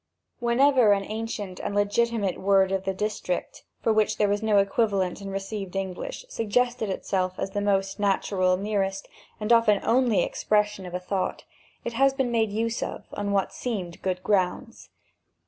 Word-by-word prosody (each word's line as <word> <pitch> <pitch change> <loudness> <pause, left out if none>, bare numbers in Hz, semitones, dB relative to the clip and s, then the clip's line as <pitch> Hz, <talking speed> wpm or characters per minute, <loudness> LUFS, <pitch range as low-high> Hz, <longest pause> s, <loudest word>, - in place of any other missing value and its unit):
Whenever 240 -2 +4
an 195 -1 0
ancient 215 -3 -5
and 200 - -3
legitimate 205 -1 +1
word 195 0 +4
of 195 0 -1
the 190 - 0
district, 205 -3 -3 0.2
for 225 - +3
which 215 0 +2
there 210 - +3
was 205 +1 0
no 215 -2 +3
equivalent 200 -2 +1
in 195 - -6
received 195 0 -5
English, 195 - -4
suggested 240 - 0
itself 185 -1 -1
as 195 - -3
the 205 - -2
most 195 0 0
natural, 190 -2 +2
nearest, 195 -1 -2 0.3
and 215 +2 +2
often 230 -3 +5
only 240 -3 +3
expression 210 -2 0
of 180 - -6
a - - -1
thought, 185 +1 -2 0.4
it 235 - -3
has 270 +3 +3
been 265 -3 0
made 225 -2 +2
use 225 +2 -1
of, - - -5
on 205 0 -2
what 195 -1 0
seemed 190 -9 -4
good 185 -1 -2
grounds. 185 -3 -1
205 Hz, 165 wpm, -26 LUFS, 195-225 Hz, 0.4 s, often